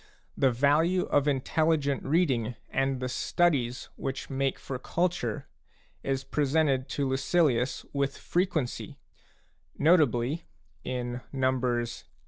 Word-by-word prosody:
The 135 - +3
value 150 +9 +3
of 145 0 +1
intelligent 145 +1 +1
reading 135 -7 +1 0.2
and 135 -1 0
the 130 - -2
studies 125 -3 0
which 135 +1 -4
make 135 0 0
for 130 -2 -6
culture 170 - -1 0.5
is 135 -1 -1
presented 140 -2 +1
to 140 -1 +1
Lucilius 130 -2 +1
with 140 -1 -1
frequency, 175 -8 -1 0.8
notably 150 -2 +3 0.4
in 125 -1 -3
Nos. 125 -3 0
135 Hz, 105 wpm, -28 LUFS, 125-155 Hz, 0.8 s, The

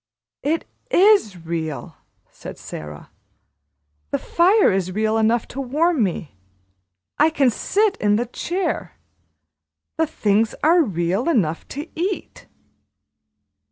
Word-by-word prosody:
"It 315 +4 -1 0.2
is 395 - +4
real," 160 -3 -4 0.4
said - - -10
Sara. 75 -1 -9 1.0
"The - - 0
fire 380 - +3
is 185 -1 -1
real 215 +2 0
enough 225 +1 +2
to 275 - -5
warm 300 +3 +1
me; 165 - -3 0.8
I 305 +2 +6
can 275 -5 +2
sit 410 - +1
in 205 0 +2
the 235 +3 0
chair; 355 +10 -3 1.0
the 320 0 +2
things 220 -6 +1
are 335 +3 +5
real 190 - 0
enough 170 - 0
to 290 +4 -6
eat." 370 +4 -4
240 Hz, 115 wpm, -21 LUFS, -, 1.0 s, I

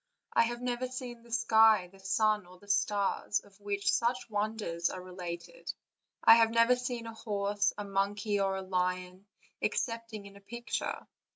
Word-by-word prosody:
I 230 - +5
have 240 +1 -4
never 250 0 -1
seen 250 -2 -7
the 235 0 -17
sky, 220 -4 +5
the 195 - -18
sun, 210 0 +1
or 180 +1 -15
the 205 - -19
stars, 205 0 +1
of 200 0 -21
which 200 0 0
such 240 0 0
wonders 205 -5 -1
are 185 - -6
related; 180 - -7 0.5
I 225 - +9
have 225 -1 +5
never 230 +2 +5
seen 245 -1 -4
a 225 - -6
horse, 205 -2 0
a 205 - -3
monkey, 200 +1 0
or 195 -1 +1
a 190 - -4
lion, 185 +1 -2 0.3
excepting 230 -3 -2
in 200 0 -12
a 200 - -14
picture. 235 +4 -4
205 Hz, 170 wpm, -31 LUFS, 195-230 Hz, 0.5 s, I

